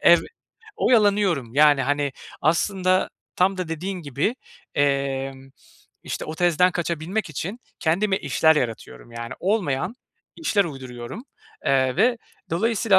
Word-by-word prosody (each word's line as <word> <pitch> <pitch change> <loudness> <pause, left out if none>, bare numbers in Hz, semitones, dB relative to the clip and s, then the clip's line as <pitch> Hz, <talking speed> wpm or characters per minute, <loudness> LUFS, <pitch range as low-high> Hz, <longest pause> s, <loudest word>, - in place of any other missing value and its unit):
ev 170 - +7 0.6
Oyalanıyorum, 200 - +3
yani, 145 -1 +6
hani, 145 +1 0 0.3
aslında 185 +4 +2 0.3
tam 190 +2 +3
da 180 -3 -3
dediğin 180 +3 -4
gibi, 145 - -1 0.4
emm, 135 -1 0 0.5
işte, - - -4
o 155 - -5
tezden 175 +1 +3
kaçabilmek 175 +3 -2
için 190 - -5 0.2
kendime 190 +5 +2
işler 160 +3 +3
yaratıyorum, 120 -2 -4
yani, 115 +1 -6
olmayan 185 - 0 0.4
işler 220 -11 +2
uyduruyorum. 130 - -7 0.4
Eee, 130 -1 +2
ve 235 +5 +3 0.3
dolayısıyla 205 +2 +3
165 Hz, 115 wpm, -24 LUFS, 135-195 Hz, 0.6 s, ev